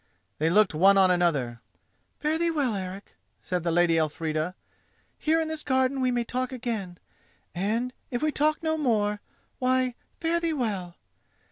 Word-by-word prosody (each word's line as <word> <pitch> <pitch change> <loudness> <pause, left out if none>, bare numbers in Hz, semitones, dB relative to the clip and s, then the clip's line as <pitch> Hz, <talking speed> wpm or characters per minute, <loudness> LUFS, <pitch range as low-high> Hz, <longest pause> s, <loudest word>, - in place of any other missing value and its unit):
They 160 +2 +2
looked 205 +1 +4
one 195 +5 +5
on 190 -1 +5
another. 145 -10 +1 0.6
"Fare 310 +2 0
thee 340 0 +2
well, 285 -8 0
Eric!" 190 +1 -6 0.3
said 180 -1 -2
the 170 - -1
Lady 165 -1 +3
Elfrida. 155 +2 -1 0.6
"Here 315 +1 +2
in 320 - -1
this 315 -1 -3
garden 260 -1 +1
we 255 - +2
may 240 -1 0
talk 255 +2 -3
again; 225 -8 -4 0.6
and, 225 +7 -1 0.2
if 245 +3 -3
we 310 - +2
talk 305 +2 +1
no 315 0 0
more—why, 250 +2 -1 0.3
fare 335 0 +1
thee 335 -1 0
well! 200 - -2
225 Hz, 155 wpm, -27 LUFS, 180-275 Hz, 0.6 s, one